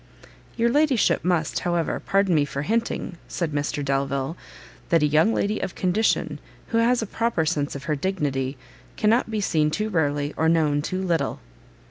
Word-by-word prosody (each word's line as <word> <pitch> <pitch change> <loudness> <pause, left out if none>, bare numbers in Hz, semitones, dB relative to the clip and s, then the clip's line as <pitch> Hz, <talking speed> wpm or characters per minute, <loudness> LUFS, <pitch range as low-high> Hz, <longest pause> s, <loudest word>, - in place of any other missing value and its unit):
"Your 235 0 +2
ladyship 290 -4 +3
must, 175 -4 0
however, 175 -2 -1
pardon 195 -2 +2
me 150 -3 +4
for 140 0 -4
hinting," 220 -3 -2
said 170 -3 -2
Mr 145 0 -2
Delvile, 140 +2 -1 0.5
"that 165 -3 +3
a - - +5
young 155 +8 +4
lady 210 -1 0
of 185 - -4
condition, 195 +5 +1 0.3
who 230 - +2
has 235 0 +3
a - - -2
proper 225 -5 0
sense 150 -3 -1
of 140 - -6
her 150 0 -1
dignity, 140 -6 -2 0.4
cannot 225 +3 +2
be 215 -1 -1
seen 155 -6 +2
too 215 +7 -2
rarely, 145 -5 0
or 160 0 +2
known 155 -3 +2
too 185 +5 -3
little." 170 -3 0
165 Hz, 170 wpm, -24 LUFS, 145-210 Hz, 0.5 s, a